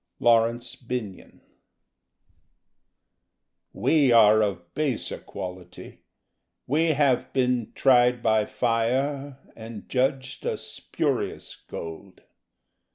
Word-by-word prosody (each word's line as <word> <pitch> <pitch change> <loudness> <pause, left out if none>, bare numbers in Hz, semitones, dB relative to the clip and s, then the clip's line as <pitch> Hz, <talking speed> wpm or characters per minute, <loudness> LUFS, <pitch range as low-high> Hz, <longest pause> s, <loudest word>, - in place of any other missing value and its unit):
_ - - -57 0.2
(Laurence 115 +1 +2
Binyon) 120 -6 -7 2.3
We 135 +5 +2
are 110 -2 +6
of 85 -5 -3
baser 145 -6 -2
quality: 90 -1 -9 0.6
we 160 +4 +2
have 140 -3 +1
been 125 -3 0
Tried 125 -2 +3
by 110 -1 +3
fire 130 +4 -1 0.2
and 110 -1 -10
judged 135 +1 -1
a - - -2
spurious - - -3
gold. 85 +4 -9
120 Hz, 90 wpm, -25 LUFS, 110-130 Hz, 2.3 s, are